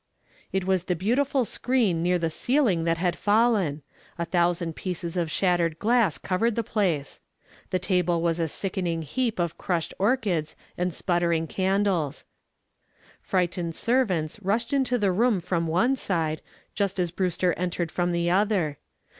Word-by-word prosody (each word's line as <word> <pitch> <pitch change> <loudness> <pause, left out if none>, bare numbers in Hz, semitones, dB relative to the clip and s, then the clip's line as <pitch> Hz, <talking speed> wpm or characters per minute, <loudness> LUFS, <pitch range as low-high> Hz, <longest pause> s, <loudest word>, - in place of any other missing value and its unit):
It 190 -1 0
was 190 -2 +1
the 180 - 0
beautiful 250 - +1
screen 225 -9 +1
near 180 +1 +2
the 165 -2 -1
ceiling 225 - +1
that 165 0 +1
had 175 0 0
fallen. 205 -8 +2 0.3
A 170 - -1
thousand 170 -1 0
pieces 175 -2 -4
of 170 -3 0
shattered 170 -1 +1
glass 225 -3 +2
covered 215 +5 0
the 230 - 0
place. 180 -10 -1 0.5
The 185 - +1
table 180 -2 +1
was 170 0 0
a 165 - +1
sickening 175 -1 -2
heap 235 - -1
of 170 -3 -2
crushed 170 -3 -1
orchids 195 - 0 0.2
and 180 +1 -1
sputtering 170 -2 0
candles. 190 -5 0 1.0
Frightened 175 -2 -1
servants 210 -8 0
rushed 225 +6 -1
into 260 -3 +2
the 205 -4 +2
room 220 +2 +2
from 170 -1 -1
one 225 +12 +2
side 165 -9 -1 0.3
just 200 -2 -1
as 175 -2 0
Brewster 180 -1 0
entered 175 -2 -2
from 175 0 0
the 170 0 0
other. 180 -5 +1
180 Hz, 150 wpm, -26 LUFS, 170-205 Hz, 1.0 s, near